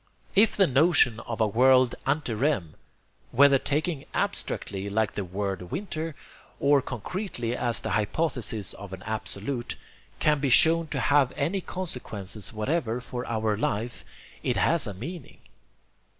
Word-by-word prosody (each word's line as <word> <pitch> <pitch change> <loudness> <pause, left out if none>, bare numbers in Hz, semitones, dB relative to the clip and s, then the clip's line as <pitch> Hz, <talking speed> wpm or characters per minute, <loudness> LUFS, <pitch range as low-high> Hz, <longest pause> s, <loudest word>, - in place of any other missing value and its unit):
If 210 +2 +5
the 195 - +6
notion 140 -5 +4
of 115 0 -6
a 110 - +4
world 130 +3 +5
ante 145 -6 0
rem, 110 - 0 0.6
whether 140 +1 +6
taken 150 +1 -1
abstractly 100 0 -1
like 110 +1 0
the 100 - -3
word 95 -1 -4
winter, 165 - -4 0.4
or 140 0 +4
concretely 125 - -4
as 120 -2 -1
the - - -3
hypothesis 110 - -1
of 100 -2 -10
an 95 0 -8
Absolute, 110 +3 -4 0.4
can 150 -1 +2
be 140 -1 0
shown 165 +6 +5
to 145 -3 -3
have 135 +1 +3
any 175 +8 0
consequences 110 - -5
whatever 115 +2 -1
for 125 0 -6
our 110 -2 0
life, 110 +3 -2 0.4
it - - 0
has 165 -6 +2
a 100 - -5
meaning. 160 - -8
125 Hz, 140 wpm, -27 LUFS, 105-150 Hz, 0.6 s, the